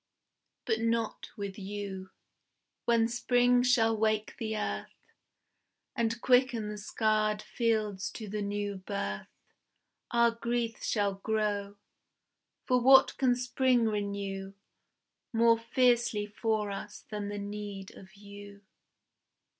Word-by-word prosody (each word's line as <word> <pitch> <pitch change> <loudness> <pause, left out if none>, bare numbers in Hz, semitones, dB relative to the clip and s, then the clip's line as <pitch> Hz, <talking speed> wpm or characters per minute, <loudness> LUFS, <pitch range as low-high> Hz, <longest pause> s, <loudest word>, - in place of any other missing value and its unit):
But 220 - +1
not 230 -1 -1
with 200 0 -5
you. 195 -1 -6 0.8
When 230 -1 +3
Spring 245 +1 +3
shall 235 -3 +3
wake 215 0 0
the 220 -2 -2
earth, 210 - -4 1.0
And 230 0 0
quicken 245 -4 +3
the 210 0 -6
scarred 215 0 0
fields 215 -4 -1
to 220 - -7
the 210 +1 -3
new 205 0 -2
birth, 185 - -4 0.8
Our 235 0 +4
grief 235 0 -2
shall 205 -2 +1
grow. 205 0 -2 0.9
For 250 -1 +2
what 265 +1 +7
can 255 -2 +4
Spring 250 -1 +2
renew 200 -2 -3 0.8
More 230 -1 +4
fiercely 240 -3 +2
for 210 0 -1
us 205 +1 -7
than 205 -1 -3
the 205 - -4
need 205 -1 -6
of 190 +2 -14
you? 200 0 -12
215 Hz, 115 wpm, -30 LUFS, 205-235 Hz, 1.0 s, what